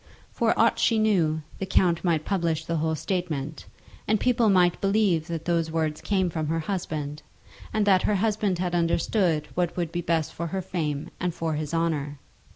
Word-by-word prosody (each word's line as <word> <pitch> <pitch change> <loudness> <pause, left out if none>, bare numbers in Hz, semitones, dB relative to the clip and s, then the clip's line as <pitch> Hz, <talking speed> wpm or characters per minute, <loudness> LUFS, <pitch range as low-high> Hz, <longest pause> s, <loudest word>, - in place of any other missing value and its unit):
For - - +1
aught - - +4
she 230 - +3
knew, 170 -8 +2 0.2
the 190 - -3
count 175 -2 +2
might 165 -4 +1
publish 165 -5 0
the 170 -1 -1
whole 160 +1 0
statement, 155 -4 -3 0.4
and 215 0 +2
people 240 -2 +3
might 180 -3 +3
believe 195 -5 +2
that 165 -2 -4
those 170 -2 +1
words 160 -1 -1
came 190 -3 0
from 155 -2 -2
her 165 +1 0
husband, 155 -5 -4 0.5
and 215 -1 +1
that 190 -2 +5
her 210 - +1
husband 205 -2 +1
had 180 0 -2
understood 170 -1 +1
what 175 -1 -1
would 170 -2 -1
be 175 - -2
best 165 -2 0
for 170 - -4
her 190 +3 -3
fame 150 -6 -3
and 180 -2 -2
for 165 -1 -2
his 150 -1 -3
honour. 155 -4 -1
170 Hz, 185 wpm, -26 LUFS, 160-190 Hz, 0.5 s, that